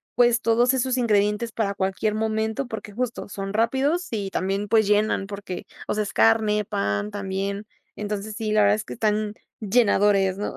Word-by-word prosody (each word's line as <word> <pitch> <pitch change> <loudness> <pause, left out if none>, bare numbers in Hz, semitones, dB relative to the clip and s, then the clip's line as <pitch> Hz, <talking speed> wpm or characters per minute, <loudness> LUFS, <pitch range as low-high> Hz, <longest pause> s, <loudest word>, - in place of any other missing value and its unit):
pues, 240 -1 +4
todos 240 +2 +3
esos 260 0 0
ingredientes 210 -1 +1
para 205 -3 -1
cualquier 195 +2 -1
momento, 220 +3 -1
porque, 220 -2 -7
justo, 245 +1 -3
son 195 0 -5
rápidos 270 - +1
y 205 -3 -2
también, 195 +2 -1
pues, 220 -1 +3
llenan 210 -1 +2
porque, 200 -2 -6 0.2
o - - 0
sea, 215 0 0
es 205 - -6
carne, 210 - +3
pan 100 - -2
también. 200 +1 -3 0.3
Entonces, 210 0 -4
sí, 220 -1 -3
la 215 0 +4
verdad 205 0 +5
es 215 - -4
que - - -7
están 215 -1 0 0.3
llenadores, 200 -3 +3
¿no? 205 - -4
210 Hz, 175 wpm, -24 LUFS, 200-225 Hz, 0.3 s, verdad